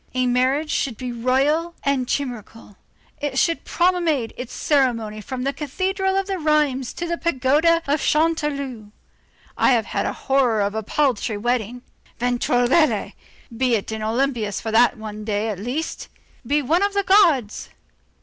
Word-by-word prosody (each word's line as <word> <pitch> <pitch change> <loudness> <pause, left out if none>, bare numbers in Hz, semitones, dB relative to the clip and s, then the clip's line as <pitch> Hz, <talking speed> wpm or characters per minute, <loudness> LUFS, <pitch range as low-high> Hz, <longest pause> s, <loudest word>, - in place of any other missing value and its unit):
A 255 0 +1
marriage 260 +5 +1
should 245 -6 -1
be 250 -1 -5
royal 275 +8 +1
and 275 -3 0
chimerical; 235 -6 -5 0.4
it 285 -2 -3
should 335 +4 +1
promenade 340 -9 +1
its 250 -1 -7
ceremony 230 -7 0
from 250 +3 -5
the 275 +1 -1
cathedral 380 +7 -1
of 390 0 -1
Rheims 300 -8 0
to 345 - -4
the 340 0 -3
pagoda 325 +3 +2
of 285 +1 0
Chanteloup. 285 -8 -1 0.6
I - - +3
have 230 -3 +1
a - - 0
horror 255 -5 +1
of 200 0 0
a 220 - -2
paltry 235 -2 0
wedding. 240 +1 -2 0.4
Ventregoulette! 245 +5 +2 0.4
be 250 0 +2
in 220 +1 -4
Olympus 225 -2 -1
for 220 - -4
that 235 +2 +4
one 215 -1 -7
day, 210 +1 -1
at 200 -4 -4
least. 255 +10 -4 0.4
Be 290 +2 +1
one 325 +8 +2
of 405 0 0
the 400 - +2
gods. 335 - +3
260 Hz, 150 wpm, -22 LUFS, 230-305 Hz, 0.6 s, that